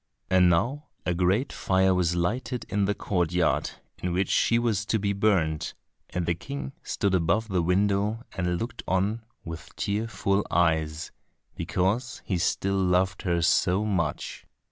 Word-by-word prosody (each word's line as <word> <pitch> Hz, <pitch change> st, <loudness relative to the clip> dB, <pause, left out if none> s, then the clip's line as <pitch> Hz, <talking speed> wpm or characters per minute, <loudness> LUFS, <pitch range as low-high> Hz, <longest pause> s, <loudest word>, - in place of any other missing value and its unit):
And 90 Hz, -1 st, +6 dB
now 125 Hz, -, +1 dB, 0.2 s
a 90 Hz, -, +1 dB
great 95 Hz, +9 st, +1 dB
fire 95 Hz, 0 st, +2 dB
was 90 Hz, -2 st, +1 dB
lighted 120 Hz, +8 st, -1 dB
in 100 Hz, -1 st, +1 dB
the 105 Hz, +1 st, 0 dB
courtyard 90 Hz, -2 st, +1 dB, 0.3 s
in 90 Hz, -1 st, -1 dB
which 95 Hz, +1 st, 0 dB
she 115 Hz, -, +3 dB
was 115 Hz, -3 st, +1 dB
to 110 Hz, -, +2 dB
be 100 Hz, -1 st, 0 dB
burnt, 95 Hz, -7 st, +1 dB, 0.3 s
and 90 Hz, -1 st, -2 dB
the 85 Hz, -, +2 dB
King 140 Hz, -, -6 dB
stood 100 Hz, -3 st, -1 dB
above 95 Hz, +5 st, +2 dB
at 110 Hz, -, -12 dB
the 90 Hz, -2 st, +2 dB
window 100 Hz, +5 st, +1 dB
and 90 Hz, -2 st, 0 dB
looked 115 Hz, +3 st, -5 dB
on 100 Hz, +5 st, +1 dB, 0.2 s
with 80 Hz, 0 st, -8 dB
tearful 105 Hz, -1 st, 0 dB
eyes, 80 Hz, -2 st, +1 dB, 0.4 s
because 110 Hz, +7 st, -1 dB
he 90 Hz, -3 st, -1 dB
still 100 Hz, +2 st, 0 dB
loved 95 Hz, 0 st, +2 dB
her 85 Hz, -2 st, 0 dB
so 95 Hz, +5 st, +3 dB
much. 85 Hz, -8 st, -2 dB
95 Hz, 155 wpm, -27 LUFS, 90-105 Hz, 0.4 s, And